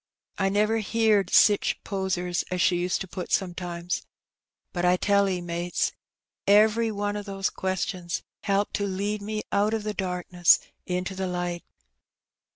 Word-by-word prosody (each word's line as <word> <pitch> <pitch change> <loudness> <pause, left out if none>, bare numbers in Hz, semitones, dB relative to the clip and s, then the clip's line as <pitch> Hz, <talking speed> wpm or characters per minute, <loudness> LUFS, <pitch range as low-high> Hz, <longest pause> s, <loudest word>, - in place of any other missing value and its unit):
I 195 -1 +2
never 210 +3 +2
heerd 215 -3 +2
sich 205 -2 +5
posers 185 -3 -1
as 180 - -2
she 175 0 +3
used 180 +1 0
to 195 - -4
pat 180 0 -6
sometimes. 175 -1 -2 0.7
But 175 - -2
I 180 +1 +4
tell 200 +1 +3
'e, 180 -2 -1
mates^ 175 0 -1 0.6
every 220 +3 +5
one 205 0 -2
of 205 0 -5
the 195 -1 -1
questions 185 -2 -2 0.2
helped 200 0 0
to 205 - -1
lead 200 +2 -2
me 215 +1 -3
out 210 +2 +2
of 220 - -3
the 210 0 -2
darkness 180 -2 +3 0.3
into 180 +1 -2
the 190 0 -3
light. 175 -1 -3
190 Hz, 155 wpm, -26 LUFS, 180-205 Hz, 0.7 s, sich